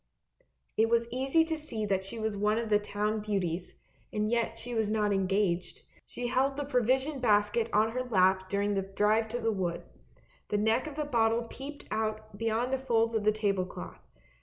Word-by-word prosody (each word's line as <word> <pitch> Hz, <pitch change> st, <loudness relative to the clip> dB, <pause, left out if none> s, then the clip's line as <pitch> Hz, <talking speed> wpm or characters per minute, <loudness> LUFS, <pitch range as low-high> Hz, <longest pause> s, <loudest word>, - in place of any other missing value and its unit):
It 225 Hz, +1 st, +4 dB
was 235 Hz, 0 st, +2 dB
easy 265 Hz, +6 st, +2 dB
to 320 Hz, 0 st, -2 dB
see 235 Hz, -9 st, -4 dB
that 195 Hz, -2 st, 0 dB
she 195 Hz, +4 st, -7 dB
was 220 Hz, -1 st, -2 dB
one 210 Hz, +2 st, +1 dB
of 230 Hz, -1 st, -2 dB
the 210 Hz, -, +5 dB
town 210 Hz, +1 st, -1 dB
beauties, 190 Hz, -5 st, -2 dB, 0.4 s
and 210 Hz, 0 st, 0 dB
yet 230 Hz, 0 st, 0 dB
she 245 Hz, +1 st, -6 dB
was 220 Hz, -2 st, +1 dB
not 210 Hz, -1 st, +1 dB
engaged. 195 Hz, -2 st, 0 dB, 0.2 s
She 245 Hz, -, -5 dB
held 270 Hz, +3 st, +1 dB
the 290 Hz, -, -1 dB
provision 265 Hz, +2 st, +1 dB
basket 215 Hz, 0 st, +2 dB
on 215 Hz, +2 st, +3 dB
her 255 Hz, +2 st, -2 dB
lap 190 Hz, -5 st, +2 dB
during 200 Hz, +1 st, 0 dB
the 195 Hz, -, +1 dB
drive 210 Hz, +3 st, +1 dB
to 240 Hz, +2 st, -3 dB
the 225 Hz, -1 st, +1 dB
wood. 180 Hz, -4 st, -2 dB, 0.6 s
The 210 Hz, -, 0 dB
neck 220 Hz, +7 st, +2 dB
of 300 Hz, -, -7 dB
the 300 Hz, -1 st, -2 dB
bottle 230 Hz, -3 st, +2 dB
peeped 275 Hz, +5 st, -8 dB
out 215 Hz, -1 st, -2 dB
beyond 230 Hz, +4 st, 0 dB
the 265 Hz, -, +1 dB
folds 230 Hz, -3 st, +1 dB
of 220 Hz, -2 st, 0 dB
the 215 Hz, -, +6 dB
table 205 Hz, -3 st, 0 dB
cloth. -, -, -9 dB
220 Hz, 195 wpm, -30 LUFS, 205-240 Hz, 0.6 s, the